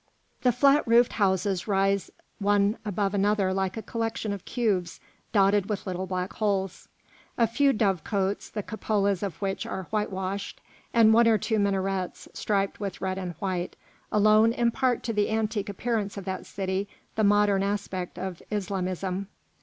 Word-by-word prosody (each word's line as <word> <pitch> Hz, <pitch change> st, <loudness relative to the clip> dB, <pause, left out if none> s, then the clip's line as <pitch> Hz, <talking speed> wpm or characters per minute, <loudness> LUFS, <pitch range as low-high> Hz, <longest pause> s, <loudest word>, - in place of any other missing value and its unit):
The 250 Hz, -, +4 dB
flat 275 Hz, +4 st, +4 dB
roofed 235 Hz, +1 st, +5 dB
houses 190 Hz, -2 st, +1 dB
rise 195 Hz, -1 st, +1 dB, 0.3 s
one 205 Hz, +1 st, +2 dB
above 200 Hz, -1 st, -1 dB
another 200 Hz, -1 st, +2 dB
like 190 Hz, +1 st, -1 dB
a 220 Hz, -, -4 dB
collection 225 Hz, -2 st, -2 dB
of 200 Hz, -, -7 dB
cubes 195 Hz, -8 st, -1 dB, 0.3 s
dotted 200 Hz, -1 st, +3 dB
with 210 Hz, -2 st, -3 dB
little 185 Hz, -1 st, -3 dB
black 185 Hz, 0 st, -3 dB
holes. 195 Hz, -3 st, -1 dB, 0.5 s
A 235 Hz, -, +5 dB
few 275 Hz, +5 st, +3 dB
dovecotes, 195 Hz, -, 0 dB
the 210 Hz, -, -4 dB
cupolas 200 Hz, -3 st, 0 dB
of 195 Hz, -6 st, -4 dB
which 195 Hz, -1 st, -1 dB
are 190 Hz, -, -4 dB
whitewashed, 200 Hz, -2 st, -3 dB, 0.3 s
and 225 Hz, -2 st, +6 dB
one 230 Hz, +1 st, +6 dB
or 225 Hz, -1 st, +5 dB
two 220 Hz, +2 st, 0 dB
minarets 195 Hz, -2 st, -1 dB
striped 200 Hz, -2 st, -1 dB
with 200 Hz, -3 st, -4 dB
red 190 Hz, 0 st, -2 dB
and 180 Hz, -2 st, -5 dB
white, 180 Hz, +1 st, -3 dB, 0.4 s
alone 215 Hz, +2 st, +5 dB
impart 240 Hz, +1 st, +1 dB
to 230 Hz, -, -2 dB
the 210 Hz, -1 st, +1 dB
antique 220 Hz, -1 st, -1 dB
appearance 210 Hz, 0 st, -2 dB
of 195 Hz, -, -6 dB
that 190 Hz, -1 st, -4 dB
city 195 Hz, +1 st, -2 dB, 0.3 s
the 220 Hz, -, +1 dB
modern 205 Hz, -1 st, +4 dB
aspect 195 Hz, -2 st, -3 dB
of 185 Hz, -2 st, -5 dB
Islamism. 190 Hz, -1 st, -2 dB
200 Hz, 155 wpm, -27 LUFS, 190-215 Hz, 0.5 s, and